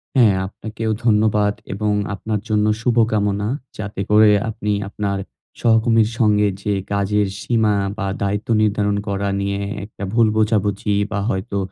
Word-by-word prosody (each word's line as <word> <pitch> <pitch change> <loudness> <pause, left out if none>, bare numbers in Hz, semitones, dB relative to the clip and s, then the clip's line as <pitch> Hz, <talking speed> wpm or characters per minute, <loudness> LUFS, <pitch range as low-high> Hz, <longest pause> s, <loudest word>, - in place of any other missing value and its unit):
হ্যাঁ, 115 -7 +5
আপনাকেও 110 +2 -5
ধন্যবাদ 105 -2 +3 0.2
এবং 105 +1 -1 0.2
আপনার 105 +2 -3
জন্য 105 -1 +2 0.2
শুভকামনা। 110 -4 +1 0.3
যাতে 105 -2 -5
করে 105 0 +6 0.2
আপনি 105 -1 -3 0.2
আপনার 100 -1 -2 0.4
সহকর্মীর 115 -1 +3
সঙ্গে 105 -2 +3 0.2
যে 105 - 0 0.2
কাজের 100 +1 +1
সীমা 110 -3 +2 0.2
বা, 100 - -2 0.2
দায়িত্ব 105 +1 -1
নির্ধারণ 105 -1 +1
করা 100 0 -1
নিয়ে 100 0 -2
এ 105 - -5
একটা 105 - -10
ভুল 115 -1 +4
বোঝাবুঝি 105 -1 +1 0.2
বা, 100 - -1
হয়তো 100 +1 -2
105 Hz, 140 wpm, -20 LUFS, 100-110 Hz, 0.4 s, করে